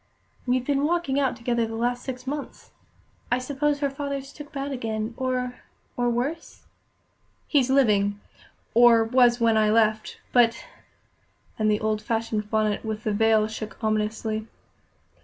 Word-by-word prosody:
"We've 250 Hz, 0 st, +1 dB
been 280 Hz, 0 st, +1 dB
walking 320 Hz, -4 st, 0 dB
out 265 Hz, -3 st, +1 dB
together 235 Hz, -1 st, -1 dB
the 225 Hz, -, -6 dB
last 245 Hz, +2 st, -1 dB
six 255 Hz, -1 st, -6 dB
months. 285 Hz, +2 st, -6 dB, 0.6 s
I 245 Hz, -, +3 dB
suppose 285 Hz, +3 st, -1 dB
her 280 Hz, -, +1 dB
father's 275 Hz, -1 st, -5 dB
took 295 Hz, 0 st, -11 dB
bad 280 Hz, -1 st, -4 dB
again, 225 Hz, -3 st, -3 dB
or 255 Hz, -1 st, -2 dB, 0.3 s
or 245 Hz, 0 st, +1 dB
worse?" 270 Hz, +8 st, -3 dB, 0.8 s
"He's 270 Hz, -4 st, +2 dB
living 205 Hz, -7 st, +3 dB, 0.5 s
or 235 Hz, -1 st, +6 dB
was 240 Hz, +1 st, +4 dB
when 230 Hz, -1 st, +3 dB
I 215 Hz, -1 st, +3 dB
left; 215 Hz, 0 st, +1 dB
but 230 Hz, -2 st, +3 dB, 0.5 s
" -, -, -37 dB
and 215 Hz, 0 st, +2 dB
the 210 Hz, 0 st, +1 dB
old 215 Hz, -1 st, 0 dB
fashioned 225 Hz, -1 st, -2 dB
bonnet 215 Hz, -2 st, 0 dB
with 215 Hz, -1 st, -4 dB
the 215 Hz, -, 0 dB
veil 220 Hz, 0 st, +3 dB
shook 215 Hz, 0 st, -7 dB
ominously. 215 Hz, 0 st, -1 dB
235 Hz, 150 wpm, -25 LUFS, 220-265 Hz, 0.8 s, or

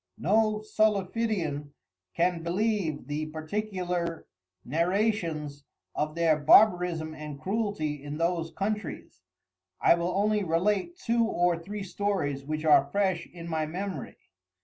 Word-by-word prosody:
No 215 Hz, +3 st, +2 dB
Solifidian 200 Hz, -8 st, 0 dB, 0.4 s
can 175 Hz, 0 st, +1 dB
believe 180 Hz, -2 st, -1 dB
the 150 Hz, +1 st, -3 dB
particular 175 Hz, 0 st, -3 dB, 0.4 s
Narrations 165 Hz, -, 0 dB, 0.3 s
of 155 Hz, +1 st, -2 dB
their 165 Hz, -2 st, +3 dB
Barbarism, 175 Hz, -1 st, +4 dB
and 150 Hz, -2 st, -8 dB
Cruelty 185 Hz, -6 st, -2 dB
in 145 Hz, +1 st, -5 dB
those 165 Hz, 0 st, 0 dB
Countreys. 210 Hz, +1 st, -4 dB, 0.6 s
I -, -, +6 dB
will 170 Hz, +1 st, -1 dB
only 210 Hz, +1 st, +2 dB
relate 195 Hz, -, 0 dB
two 235 Hz, -9 st, +1 dB
or 175 Hz, -5 st, +2 dB
three 195 Hz, +5 st, -6 dB
Stories 185 Hz, -9 st, -2 dB
which 155 Hz, +2 st, -3 dB
are 145 Hz, -2 st, +5 dB
fresh 190 Hz, -4 st, 0 dB
in 170 Hz, -1 st, -10 dB
my 160 Hz, -2 st, -1 dB
memory. 190 Hz, +4 st, -5 dB
175 Hz, 120 wpm, -28 LUFS, 155-205 Hz, 0.6 s, I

